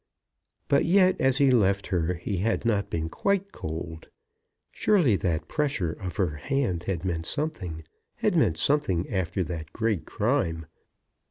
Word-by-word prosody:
But 140 - +3
yet 185 +1 +4
as 135 0 +3
he 140 -1 +4
left 100 -4 +3
her 90 0 +1
he 90 +3 -3
had 115 +5 0
not 105 -3 +1
been 80 -1 -2
quite 200 - -1
cold. 80 +1 -6 0.6
Surely 175 - +3
that 85 -5 -1
pressure 135 - -1
of 90 -2 -6
her 85 -7 0
hand 115 - -1
had 90 -2 -2
meant 85 -2 -2
something; 110 - -3 0.3
had - - 0
meant 80 - +3
something 95 - +1
after 95 0 0
that 80 -2 -6
great 110 -6 -1
crime! 105 - 0
95 Hz, 150 wpm, -27 LUFS, 85-135 Hz, 0.6 s, yet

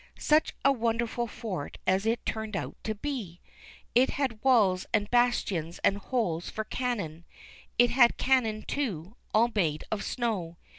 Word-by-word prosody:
Such 305 +1 +2
a 275 - +7
wonderful 235 -1 -1
fort 200 -9 -5
as 190 +3 +2
it 230 +1 0
turned 220 -2 -3
out - - -5
to 220 - -1
be! 210 -9 -5 0.5
It 250 +3 +5
had 255 -6 -2
walls 210 -9 +4
and 205 - +1
bastions 205 -9 +1
and 195 - +3
holes 195 -7 -2
for 220 - -3
cannon. 205 -11 -3 0.5
It 245 0 +5
had 240 -1 +5
cannon 225 -5 +2
too, 210 - -3 0.2
all 230 +3 +3
made 160 -7 0
of 215 -2 -1
snow. 200 -9 -2
220 Hz, 150 wpm, -29 LUFS, 190-245 Hz, 0.5 s, a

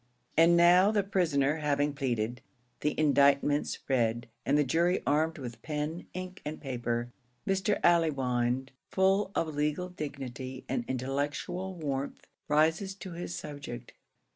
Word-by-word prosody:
And 170 +1 +6
now 175 +3 +6
the 210 -2 +2
prisoner 160 -7 +1
having 145 -1 +1
pleaded, 125 -4 -2 0.4
the 150 - -1
indictments 145 -1 +3
read, 120 -3 +1 0.2
and 140 +2 +4
the 150 - +4
jury 170 +6 +1
armed 155 +3 +1
with 120 -5 -7
pen, 155 +2 -4
ink, 185 0 -6
and 150 +1 -5
paper, 120 -3 -3 0.3
Mr. 195 +2 +1
Allewinde, 130 -6 +2 0.2
full 190 +1 +2
of 160 -2 0
legal 150 +5 -1
dignity 135 -5 -6
and 245 - -1
intellectual 145 +8 -2
warmth, 140 -4 -4 0.2
rises 160 +6 +2
to 190 -2 -8
his 175 0 -5
subject. 140 -5 -7
150 Hz, 130 wpm, -30 LUFS, 135-175 Hz, 0.4 s, And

